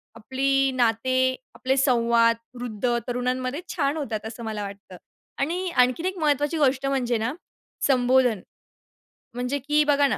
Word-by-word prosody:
आपली 270 +3 +1
नाते, 255 +2 +2 0.2
आपले 260 +1 0
संवाद, 235 -3 +3 0.2
वृद्ध, 240 0 -1
तरुणांमध्ये 255 +4 -2
छान 290 -2 0
होतात, 225 -8 -4
असं 225 +1 -7
मला 215 -2 -4
वाटतं. 195 -2 -9 0.4
आणि 350 +6 -1
आणखीन 255 +1 +2
एक 375 0 -2
महत्त्वाची 295 +1 +1
गोष्ट 275 -2 +2
म्हणजे 250 -3 0
ना, 225 +5 -2 0.5
संबोधन. 250 -4 +3 0.9
म्हणजे 250 +3 -2
की 300 0 +4
बघा 285 -1 +3
ना, 225 - -1
255 Hz, 135 wpm, -25 LUFS, 235-280 Hz, 0.9 s, की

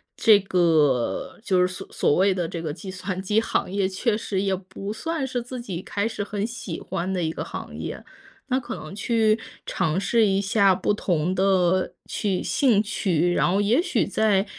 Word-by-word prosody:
这 215 -3 +6
个 160 -10 +1
就 185 -5 +2
是 180 - +4
所 185 - -8
所 - - +2
谓 190 +2 +4
的 175 -3 -2
这 165 0 -5
个 155 -3 -3
计 190 +4 -9
算 185 0 -4
机 210 +3 +2
行 225 - -1
业 195 0 0
确 210 +4 0
实 200 -3 -2
也 195 -1 +1
不 190 +2 -7
算 320 +3 -3
是 245 -1 -2
自 245 +1 -7
己 185 -7 -5
开 205 +2 -1
始 220 -2 -3
很 205 +1 -3
喜 225 -8 -6
欢 180 +3 -3
的 185 - -1
一 160 -1 0
个 - - -5
行 - - -7
业。 - - -6 0.4
那 260 0 +1
可 250 - -6
能 155 - -9
去 220 +1 +2 0.3
尝 175 -1 0
试 220 +3 +3
一 195 0 +2
下 200 -2 +3
不 190 +3 0
同 175 -3 0
的 185 -1 +2
趣 195 -4 -1
兴 230 -7 +3
趣， 175 -5 +1
然 - - +2
后 195 - +2
也 230 +10 +3
许 - - 0
在 205 -3 +2
195 Hz, 215 characters per minute, -24 LUFS, 180-215 Hz, 0.4 s, 这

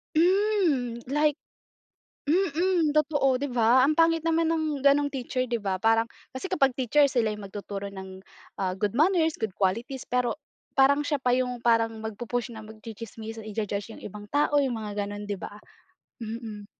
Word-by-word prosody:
Hmm. 340 - +2
Like 295 0 +3 0.9
mm, 345 +1 +2
totoo, 290 -3 +2
'di 285 - -2
ba. 245 +2 +5
Ang 300 - +3
pangit 330 0 +3
naman 330 0 +2
ng 310 -3 -1
gano’ng 285 +1 +3
teacher, 255 -1 -2
'di 235 -2 -2
ba. 195 -2 -1
Parang 225 +3 +2 0.2
kasi 260 +9 -5
kapag 275 -8 +3
teacher 265 +3 +3
sila 240 -5 +1
yung 210 -1 -6
magtuturo 200 0 -6
ng, 190 -1 -8 0.4
ah, 185 -2 -1
good 205 +4 -2
manners, 325 0 +3
good 220 -4 -3
qualities 230 +8 -2
pero 250 -1 +1 0.4
parang 280 +2 +4
siya 290 -3 0
pa 250 - +3
yung 250 -1 -2
parang 225 -1 +2
magpu-push 240 +3 -3
na 220 - -8
magtsi-tsismisan, 220 0 -9
i-ju-judge 210 0 -3
yung - - -13
ibang 205 +1 -8
tao, 290 +4 +2
yung 270 -3 +1
mga 205 -1 -3
gano'n, 205 0 -6
'di 205 - -2
ba. 185 - -8 0.7
Mm. 220 -2 -6
245 Hz, 165 wpm, -27 LUFS, 215-295 Hz, 0.9 s, ba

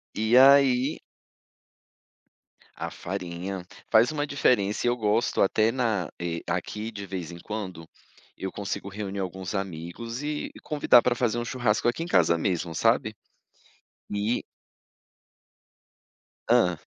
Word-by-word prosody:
E 110 +3 +3
aí 135 0 +6 1.8
A - - -4
farinha. 90 0 -5 0.3
Faz 115 +5 +5
uma 145 -1 -1
diferença 115 -7 +1
e - - +4
eu 120 - +1
gosto 110 +2 +1
até 110 +3 +3
na 115 -8 -1
eh, 85 -1 -3
aqui 110 +2 -3
de 100 -2 -7
vez 90 -4 -5
em 85 - -9
quando, 95 -6 -6 0.5
eu 95 - -4
consigo 100 0 -5
reunir 100 0 -5
alguns 95 +1 -4
amigos 95 - -5
e 150 0 -3
convidar 145 -5 +5
pra 125 -1 +1
fazer 120 -2 0
um 120 - -2
churrasco 120 -3 0
aqui 140 +8 0
em - - -6
casa 85 - +3
mesmo, 85 -2 -1
sabe? 110 +1 +2 0.9
E 105 +3 -1 2.0
Hã? 110 -8 +3
105 Hz, 130 wpm, -26 LUFS, 95-120 Hz, 2.0 s, aí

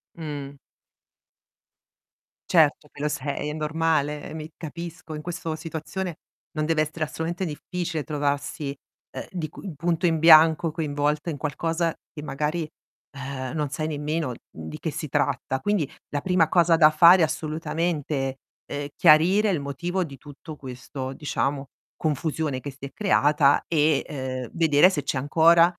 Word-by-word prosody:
Mh. 145 -3 -6 1.9
Certo 155 -3 +4
che 145 - -9
lo 150 - +1
sei, 145 0 -3
è - - -3
normale, 155 -1 -1
mi 155 0 -6
capisco. 170 0 -7
In 150 - -6
questo 165 -1 -4
situazione, 165 +2 -5 0.3
non 155 -2 -2
deve 160 0 +1
essere 155 +1 -4
assolutamente 165 +4 -3
difficile 165 0 -4
trovarsi, 145 -1 -2 0.4
ehm, - - -7
di 165 -5 -4
cu 185 +1 -8
punto 170 +3 0
in 165 -1 +3
bianco 160 0 +7
coinvolta 150 0 -1
in 155 - -2
qualcosa 165 +4 -1 0.2
che 150 -1 -9
magari, 150 +3 -2 0.5
ehm, 130 -1 -5
non 150 -2 -1
sai 155 +3 -3
nemmeno, 150 0 -2
mhmm, 80 -9 -9
di - - -8
che - - -3
si - - -5
tratta. 130 0 0
Quindi, 190 -3 0 0.2
la 145 - -3
prima 180 -2 +3
cosa 170 0 +4
da 155 -2 +8
fare 170 +4 +7
assolutamente, 155 -3 -2 0.3
ehm, 145 0 -4
chiarire 180 +7 +5
il 175 -6 +1
motivo 175 +6 -2
di 140 -3 -10
tutto 145 +2 -11
questo 130 0 -7
diciamo, 140 -1 -2 0.3
confusione 150 -2 -1
che 145 - -6
si 135 +1 -10
è 140 - -8
creata 150 -8 +3
e, 155 -3 +2
ehm, 130 -3 -5
vedere 165 +1 +5
se 150 -7 -2
c'è - - -1
ancora, 165 +5 +5
155 Hz, 150 wpm, -25 LUFS, 145-165 Hz, 1.9 s, da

